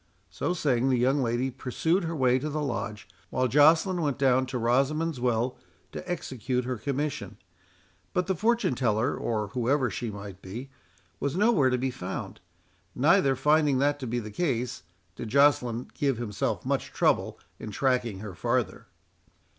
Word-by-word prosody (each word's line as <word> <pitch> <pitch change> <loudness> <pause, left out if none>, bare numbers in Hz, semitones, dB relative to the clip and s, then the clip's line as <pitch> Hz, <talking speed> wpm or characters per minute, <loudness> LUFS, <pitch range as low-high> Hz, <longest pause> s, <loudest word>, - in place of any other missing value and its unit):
So 175 - -2
saying, 135 -6 +1
the 130 - +3
young 130 +4 +2
lady 120 +2 0
pursued 160 +8 0
her 165 0 -3
way 130 -3 +3
to 150 +4 -3
the 155 +1 -2
Lodge, 105 -6 -4 0.2
while 130 0 +1
Joceline 160 - +4
went 145 -4 0
down 130 -1 +3
to 130 0 -3
Rosamond's 135 +6 +1
Well 120 0 0 0.3
to 180 - -6
execute 125 -6 -2
her 125 -1 -2
commission. 140 -3 -3 0.7
But 180 -1 0
the 190 - 0
fortune 230 - +1
teller, 120 +1 +1
or 105 -3 -2
whoever 125 +2 +1
she 120 - -3
might 100 -2 -8
be, 120 +9 -8 0.5
was 140 +2 -1
nowhere 200 - +4
to 125 - +1
be 130 +1 -1
found; 95 -7 -6 0.6
neither, 135 -1 +4
finding 150 0 +3
that 145 +2 +1
to 130 - -5
be 120 +2 -2
the 105 -3 -5
case, 125 - -1 0.3
did 115 - -6
Joceline 125 -3 +3
give 135 -4 0
himself 110 -4 -2
much - - -1
trouble - - +1 0.2
in 110 - -6
tracking 120 -4 0
her 105 -3 -7
farther. 120 +5 -1
130 Hz, 160 wpm, -27 LUFS, 120-145 Hz, 0.7 s, Joceline